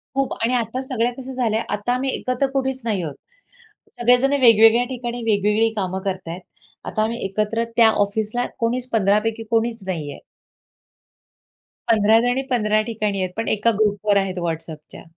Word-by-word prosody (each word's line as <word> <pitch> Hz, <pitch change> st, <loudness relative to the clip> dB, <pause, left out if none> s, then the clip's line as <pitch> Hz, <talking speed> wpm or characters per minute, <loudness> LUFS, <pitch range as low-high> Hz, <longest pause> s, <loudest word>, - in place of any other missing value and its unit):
खूप 275 Hz, -1 st, 0 dB
आणि 235 Hz, +2 st, +1 dB
आता 245 Hz, +1 st, -1 dB
सगळ्या 245 Hz, -2 st, -1 dB
कसं 265 Hz, +1 st, -8 dB
झाल्या, 230 Hz, -3 st, 0 dB
आता 210 Hz, +4 st, -1 dB
आम्ही 265 Hz, +2 st, -1 dB
एकत्र 255 Hz, +2 st, -1 dB
कुठेच 265 Hz, -1 st, -1 dB
नाही 210 Hz, -5 st, 0 dB
आहोत. 150 Hz, -4 st, -5 dB, 0.8 s
सगळे 245 Hz, +1 st, +5 dB
जण 270 Hz, +3 st, +1 dB
वेगवेगळ्या 230 Hz, 0 st, +6 dB
ठिकाणी 245 Hz, -1 st, -5 dB
वेगवेगळी 210 Hz, +1 st, +2 dB
कामं 190 Hz, -2 st, -2 dB
करत 190 Hz, -2 st, -3 dB
आहेत. 170 Hz, +3 st, -6 dB, 0.4 s
आता 215 Hz, -, -1 dB
आम्ही 230 Hz, +2 st, -2 dB
एकत्र 215 Hz, +4 st, -1 dB
त्या 230 Hz, -2 st, +7 dB, 0.2 s
ऑफिसला 220 Hz, +4 st, -2 dB
कोणीच 245 Hz, +2 st, -1 dB
15 205 Hz, -1 st, +3 dB
पैकी 225 Hz, 0 st, -2 dB
कोणीच 230 Hz, 0 st, 0 dB
नाही 155 Hz, -6 st, -3 dB
आहे. -, -, -10 dB, 1.7 s
15 220 Hz, 0 st, +4 dB
जणी 245 Hz, +2 st, +1 dB
15 215 Hz, -3 st, +2 dB
ठिकाणी 210 Hz, -3 st, -2 dB
आहेत, 185 Hz, -, -2 dB
पण 225 Hz, -, -2 dB
एका 220 Hz, +2 st, +2 dB
ग्रुपवर 205 Hz, -1 st, +2 dB
आहेत 190 Hz, -2 st, -1 dB
WhatsAppच्या. 160 Hz, -1 st, -7 dB
225 Hz, 160 wpm, -21 LUFS, 205-245 Hz, 1.7 s, त्या